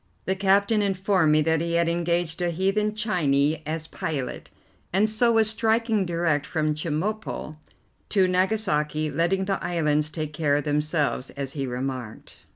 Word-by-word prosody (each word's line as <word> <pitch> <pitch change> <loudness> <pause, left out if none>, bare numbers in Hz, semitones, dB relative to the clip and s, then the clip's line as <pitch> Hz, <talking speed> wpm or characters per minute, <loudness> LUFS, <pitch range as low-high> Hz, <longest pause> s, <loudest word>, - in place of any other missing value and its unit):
The 190 - 0
captain 200 +2 +3
informed 190 -4 +2
me 155 0 +4
that 160 0 +1
he 170 0 -2
had 170 0 +2
engaged 170 0 0
a 175 - +1
"heathen 195 +5 0
Chinee" 155 -8 +1
as 160 0 -3
pilot, 145 -4 -4 0.4
and 200 +4 +3
so 220 +2 +2
was 225 -1 +4
striking 220 -2 +1
direct 165 -4 0
from 155 -2 -1
Chemulpo 155 +2 -3 0.5
to 190 -3 +3
Nagasaki, 180 -6 0
letting 170 +6 +1
the 195 0 -2
islands 150 -3 +1
take 155 -1 -5
care 150 -2 +1
of 145 - 0
themselves, 150 -2 0
as 140 -1 -6
he 140 -3 -3
remarked. 125 -2 -5
170 Hz, 155 wpm, -25 LUFS, 150-195 Hz, 0.5 s, me